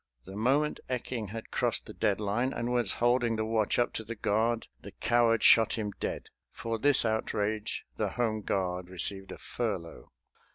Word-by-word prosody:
The 95 - -9
moment 135 +8 +1
Ecking 125 -3 -3
had 110 +2 -8
crossed - - 0
the - - -9
dead 100 - 0
line, 110 +6 0
and 120 +1 -2
was 120 -5 +1
holding 120 -1 +2
the 110 0 -1
watch 110 -2 +1
up 120 - +1
to 110 - -4
the 115 +2 -6
guard, 110 +2 0 0.2
the - - -10
coward 120 -1 +2
shot 115 -1 +6
him 105 -2 -2
dead. - - -4 0.2
For 115 -1 -4
this 145 0 +5
outrage 110 -1 -1
the - - 0
home 110 -3 -1
guard 90 -2 -2
received 95 +2 -1
a - - -7
furlough. 100 -8 -5
110 Hz, 175 wpm, -30 LUFS, 105-120 Hz, 0.2 s, shot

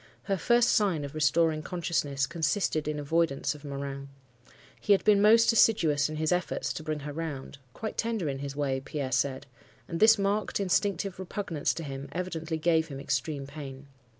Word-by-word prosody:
Her 195 - 0
first 240 +5 +3
sign 190 -10 +2
of 140 - -8
restoring 155 +1 +2
consciousness 150 -5 -1
consisted 160 +1 -1
in 150 0 -2
avoidance 145 -2 0
of 150 -1 -13
Morin. 140 -1 -6 0.7
He 205 - +3
had 195 - +2
been 205 -2 +5
most 225 +2 +6
assiduous 155 -11 +3
in 155 - -5
his 155 +1 0
efforts 180 0 -1
to - - -6
bring 155 -1 -3
her 145 +1 -6
round; 145 -3 -6
quite 220 - -6
tender 225 -7 -1
in 135 -1 -3
his 140 0 -5
way, 140 -2 -1
Pierre 140 -1 -4
said; 135 +1 0 0.4
and 165 - -4
this 220 +1 +7
marked, 200 +2 0
instinctive 195 -1 0
repugnance 185 -4 -2
to 165 - -5
him 135 -1 -6
evidently 165 -3 -3
gave 160 0 +2
him 135 -3 -7
extreme 140 +1 -2
pain. 140 -1 -9
155 Hz, 180 wpm, -28 LUFS, 140-185 Hz, 0.7 s, this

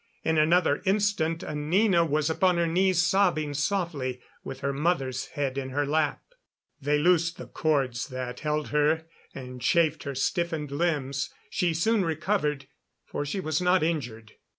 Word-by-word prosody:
In 160 -1 +2
another 160 -1 +3
instant 190 -5 +1
Anina 170 +5 +2
was 155 -2 0
upon 180 +2 +2
her 170 - +2
knees, 180 +1 +2
sobbing 175 -6 +2
softly, 150 -6 -1 0.2
with 135 - -7
her 140 +1 -1
mother's 135 -4 -1
head 140 -1 -1
in 130 -1 -5
her 145 +2 0
lap. 150 +1 0 0.6
They 145 +2 +2
loosed 170 +1 +2
the - - -8
cords 135 -6 -1
that 130 -2 -5
held 150 -1 -2
her, 150 +2 +2 0.3
and 125 -2 -8
chaffed 160 +4 +2
her 140 -1 -4
stiffened 160 +1 -1
limbs. 140 -3 -1 0.2
She 175 -2 0
soon 215 +5 +2
recovered, 155 -4 -1 0.4
for 145 - -4
she 190 - -2
was 155 -2 -1
not 180 -1 +3
injured. 120 -9 -3
155 Hz, 150 wpm, -27 LUFS, 140-175 Hz, 0.6 s, another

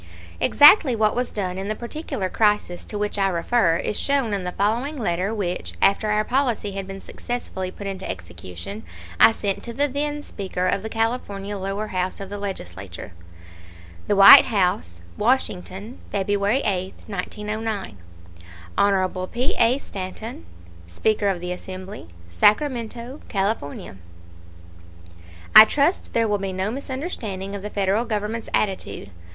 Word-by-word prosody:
Exactly 290 - +7
what 215 -1 +2
was 245 0 -1
done 185 -3 -3
in 195 - -4
the 215 - -2
particular 235 - -4
crisis 210 -3 0
to 210 - -6
which 210 0 -2
I 195 - +3
refer 175 0 +2
is 205 - -2
shown 275 -6 +1
in 195 -2 -2
the 180 - -2
following 235 +11 -1
letter 185 -3 -1
which, 190 -5 -3
after 200 +2 +3
our 210 0 +2
policy 245 -4 0
had 195 -1 -5
been 195 0 -7
successfully 215 -6 -5
put 200 +2 -9
into 190 -1 -5
execution, 85 +3 -7 0.4
I - - +8
sent 200 -3 -3
to 235 - -7
the 285 +4 +1
then 290 +2 -2
Speaker 190 -6 -4
of 200 - 0
the 220 - -5
California 220 -3 -2
lower 195 +2 -3
house 185 0 -2
of 195 -1 -7
the 205 - -5
Legislature: 95 - -7 1.0
THE 205 - +2
WHITE 195 0 +10
HOUSE, 135 - 0 0.2
WASHINGTON, 210 -2 -1
February 205 +5 +1
8, 190 -4 -2
1909. 210 - -4 0.8
HON 185 -2 +1
P. 245 +6 -1
A. 235 +3 +4
STANTON, 190 - -7 0.4
Speaker 210 - 0
of 190 -3 0
the 180 +1 -5
Assembly, 185 - -8 0.2
Sacramento, 235 - 0
California: 195 - -3 1.6
I - - +14
trust 290 - 0
there 230 -1 +2
will 205 -1 0
be 195 -1 -3
no 190 +3 -2
misunderstanding 250 - -5
of 200 - -5
the 210 - -5
Federal 200 +3 0
Government's 220 0 -3
attitude. 190 - -2
205 Hz, 145 wpm, -23 LUFS, 185-230 Hz, 1.6 s, I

